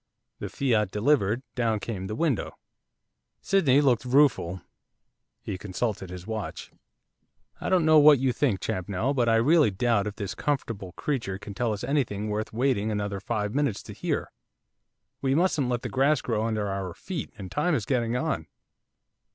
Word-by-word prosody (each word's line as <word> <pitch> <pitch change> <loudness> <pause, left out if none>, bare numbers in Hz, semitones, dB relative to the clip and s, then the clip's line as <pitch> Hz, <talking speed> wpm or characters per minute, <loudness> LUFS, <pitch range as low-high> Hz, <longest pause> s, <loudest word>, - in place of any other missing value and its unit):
The - - -5
fiat 115 -7 +1
delivered, 115 +1 +1
down 115 -3 0
came 100 -4 -5
the 105 - -4
window. 145 -5 -1 0.8
Sydney 145 -8 +3
looked 130 -5 +3
rueful, 125 - +2 0.8
he 90 - -5
consulted 100 -1 -3
his 90 0 -8
watch. 110 -1 -5 0.9
'I - - -3
don't 180 -4 +3
know 155 -1 +7
what 150 -1 +8
you 130 0 +1
think, 120 -10 +1
Champnell, 100 +8 -1
but 120 -4 +2
I 115 - +4
really 145 +5 +4
doubt 105 +1 +1
if 105 - -5
this 100 -3 -4
comfortable 115 -10 -3
creature 115 -10 -2
can 100 +1 -9
tell 120 +2 -1
us 105 -2 -4
anything 110 -8 -1
worth 105 +1 -2
waiting 115 -3 +1
another 100 -2 -2
five 105 0 -2
minutes 140 -7 0
to - - -9
hear. - - -3 0.9
We 135 0 +1
mustn't 155 -6 +2
let 120 -1 -1
the - - -2
grass 140 +2 +2
grow 110 -2 -1
under 110 -2 -1
our 95 -3 -4
feet, 175 - -5
and 95 -3 -8
time 155 +3 +1
is 110 -7 -2
getting 120 -2 0
on. 125 - -2
115 Hz, 165 wpm, -27 LUFS, 100-140 Hz, 0.9 s, what